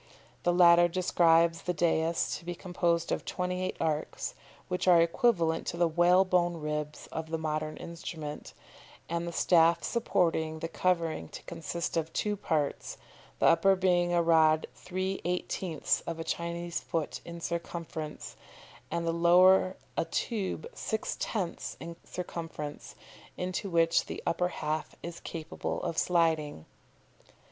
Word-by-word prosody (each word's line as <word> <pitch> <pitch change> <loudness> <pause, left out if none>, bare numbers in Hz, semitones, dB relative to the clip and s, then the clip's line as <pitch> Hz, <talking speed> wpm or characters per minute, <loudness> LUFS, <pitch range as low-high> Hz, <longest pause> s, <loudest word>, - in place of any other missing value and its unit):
The 175 - +2
latter 175 -1 +7
describes 170 -2 +3
the 180 - -2
dais 165 0 +1
to - - -17
be 175 +1 -4
composed 170 -2 0
of - - -1
28 180 0 -2
arcs, 155 -1 -2 0.3
which 180 0 -2
are 175 -2 +7
equivalent 165 -1 +2
to 170 - -3
the 170 0 +3
whalebone 175 +1 +3
ribs 150 -1 -4
of 160 0 -5
the 160 - -1
modern 155 -1 -3
instrument, 160 -3 -7 0.5
and 170 +1 -2
the - - -3
staff 170 -1 +4
supporting 165 -8 0
the 165 - -4
covering 165 - 0
to - - -10
consist 170 0 -4
of 160 0 -1
two 210 -1 0
parts, 155 -7 -2 0.4
the - - +1
upper 195 +3 +5
being 180 -2 +2
a 175 -1 +3
rod 160 -1 +4
3/18ths 180 -3 -2
of 165 -1 -4
a - - -2
Chinese 170 +1 -3
foot 160 -3 -3
in 170 0 -8
circumference, 170 -2 -5 0.5
and 170 0 -2
the 165 - +1
lower 185 +2 +5 0.2
a - - 0
tube 210 - -2
6/10ths 220 - -3
in 170 0 -7
circumference, 165 -4 -6 0.4
into 185 +2 -3
which 165 -1 +3
the - - -6
upper 180 +1 +1
half 155 -3 -3
is 170 0 -6
capable 160 -2 -5
of - - -2
sliding." 160 - +1
170 Hz, 135 wpm, -30 LUFS, 160-180 Hz, 0.5 s, latter